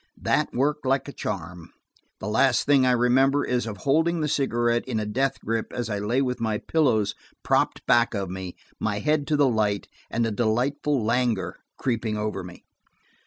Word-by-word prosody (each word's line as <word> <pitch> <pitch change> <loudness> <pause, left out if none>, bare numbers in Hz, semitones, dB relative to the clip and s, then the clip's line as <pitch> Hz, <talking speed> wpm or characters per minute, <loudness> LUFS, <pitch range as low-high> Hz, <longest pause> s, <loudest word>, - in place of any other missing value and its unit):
That - - +1
worked 145 +4 0
like 135 0 +1
a - - -5
charm; 85 0 -5 0.5
the - - -5
last 120 +3 +3
thing 140 -3 +4
I - - +4
remember 130 +3 +3
is 125 -2 -1
of 105 -2 -5
holding 160 - +1
the 150 - 0
cigarette 120 -4 +1
in 115 -4 -1
a 105 - -2
death 135 +6 -1
grip 115 0 -2
as 120 -2 -3
I 105 - -1
lay 120 +7 +1
with 125 -2 -2
my 110 -2 0
pillows 110 -9 +1 0.3
propped - - +1
back 120 -1 +3
of 100 -1 -2
me, 95 0 -6 0.2
my 105 -2 -1
head 150 +4 0
to 155 - +2
the 145 -1 +4
light, 105 -4 0 0.2
and 115 0 0
a 115 - -1
delightful 125 +4 0
languor 115 -4 0 0.2
creeping 115 -4 -1
over 105 -2 -3
me. 90 0 -12
120 Hz, 185 wpm, -25 LUFS, 105-135 Hz, 0.5 s, thing